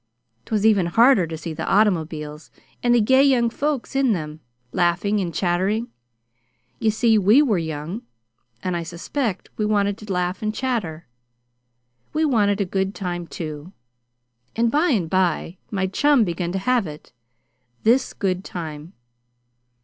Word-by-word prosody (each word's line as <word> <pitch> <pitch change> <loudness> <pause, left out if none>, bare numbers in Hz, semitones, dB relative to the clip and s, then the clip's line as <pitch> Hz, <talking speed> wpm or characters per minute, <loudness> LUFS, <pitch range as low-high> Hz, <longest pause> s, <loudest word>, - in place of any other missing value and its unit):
'Twas 215 -1 0
even 200 -5 +4
harder 225 0 +5
to 160 0 -5
see 165 0 -6
the - - -4
automobiles, 160 -7 0 0.3
and 240 0 +3
the - - +5
gay 260 +5 +4
young 245 -4 +3
folks 285 -1 -2
in 270 -4 +3
them, 155 -4 -5 0.3
laughing 180 +6 +1
and 180 -3 -2
chatting. 190 +7 0 0.9
You 225 - +2
see, 220 0 +3
we 210 +9 +5
were 215 -10 +1
young, 160 +6 -5 0.6
and 185 -1 -1
I 170 - -1
suspect 180 - -4
we 215 - 0
wanted 205 -1 +1
to 215 -2 -8
laugh 180 0 -1
and 215 0 -2
chatter. 205 -12 -2 1.1
We 315 +1 +2
wanted 210 -7 +2
a 200 - +1
good 190 +2 -2
time, 175 -3 -4
too; 155 +2 -7 0.8
and, 230 0 +2
by 305 +6 +2
and 200 - +1
by 180 0 0
my 195 -3 -1
chum 270 +7 +3
began 175 -2 -2
to - - 0
have 235 0 +1
it 150 -3 -11 0.7
this 240 +4 +3
good 185 -2 -1
time. 160 -1 -7
195 Hz, 150 wpm, -22 LUFS, 170-230 Hz, 1.1 s, harder